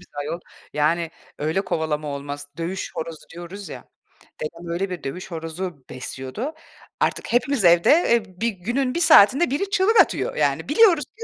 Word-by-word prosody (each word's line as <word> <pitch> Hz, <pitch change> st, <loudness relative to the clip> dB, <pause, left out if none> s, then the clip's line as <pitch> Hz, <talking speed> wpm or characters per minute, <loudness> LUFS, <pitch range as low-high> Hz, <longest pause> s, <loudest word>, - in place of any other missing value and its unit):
bizi 180 Hz, -, -20 dB
ayol. 160 Hz, +4 st, -4 dB, 0.3 s
Yani 165 Hz, +3 st, +1 dB, 0.3 s
öyle 160 Hz, +6 st, 0 dB
kovalama 155 Hz, -4 st, -2 dB
olmaz. 145 Hz, 0 st, -5 dB
Dövüş 180 Hz, +3 st, -3 dB
horozu 160 Hz, -1 st, -6 dB
diyoruz 175 Hz, +3 st, -8 dB
ya. -, -, -9 dB, 0.6 s
Dedem 170 Hz, +3 st, -6 dB
öyle 190 Hz, +2 st, -2 dB
bir 175 Hz, -4 st, -6 dB
dövüş 180 Hz, +7 st, -6 dB
horozu 165 Hz, -2 st, -6 dB
besliyordu. 130 Hz, -, -6 dB, 0.5 s
Artık -, -, -1 dB
hepimiz 245 Hz, -3 st, +2 dB
evde, 170 Hz, 0 st, +6 dB, 0.2 s
eee, 235 Hz, -2 st, +4 dB, 0.2 s
bir 235 Hz, -, +2 dB
günün 240 Hz, -, -2 dB
bir -, -, +1 dB
saatinde 310 Hz, -2 st, +6 dB
biri 345 Hz, +9 st, -1 dB
çığlık 420 Hz, +3 st, +5 dB
atıyor. -, -, -1 dB
Yani -, -, 0 dB
biliyoruz 385 Hz, -10 st, +5 dB
ki 460 Hz, -, -12 dB
175 Hz, 160 wpm, -23 LUFS, 160-250 Hz, 0.6 s, evde